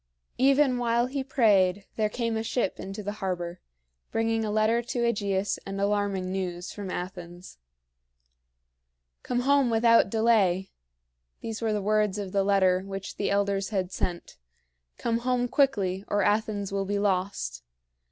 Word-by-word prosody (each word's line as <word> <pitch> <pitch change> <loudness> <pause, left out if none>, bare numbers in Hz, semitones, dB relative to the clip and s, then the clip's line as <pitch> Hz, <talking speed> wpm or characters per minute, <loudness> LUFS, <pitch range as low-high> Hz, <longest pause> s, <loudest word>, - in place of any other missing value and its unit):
Even 270 -1 +4
while 235 0 +2
he 265 +1 -3
prayed 205 -8 +3
there 215 -1 +1
came 230 0 -2
a 220 - -1
ship 225 -3 -1
into 195 +2 -6
the 205 - -3
harbor, 180 -2 -3 0.5
bringing 225 0 0
a 215 - -2
letter 215 +2 +2
to 240 0 -3
AEgeus 200 -4 0
and 195 0 -5
alarming 200 -2 0
news 180 -2 -4
from 200 -2 -6
Athens. 180 - -7 1.6
"Come 245 0 -1
home 275 -1 +3
without 230 -2 +4
delay" 200 -4 +2 0.7
these 225 0 -5
were 215 -2 0
words 210 0 +1
of 200 -2 -4
the 195 0 +2
letter 190 -2 +3
which 195 0 -7
the 205 - -1
elders 200 -1 0
had 190 -3 -2
sent 175 - -4 0.6
"come 230 0 0
home 245 0 0
quickly, 200 -9 +1
or 205 -1 +1
Athens 205 -1 0
will 195 0 -1
be 205 +1 -1
lost. 185 - -1
205 Hz, 145 wpm, -27 LUFS, 190-230 Hz, 1.6 s, Even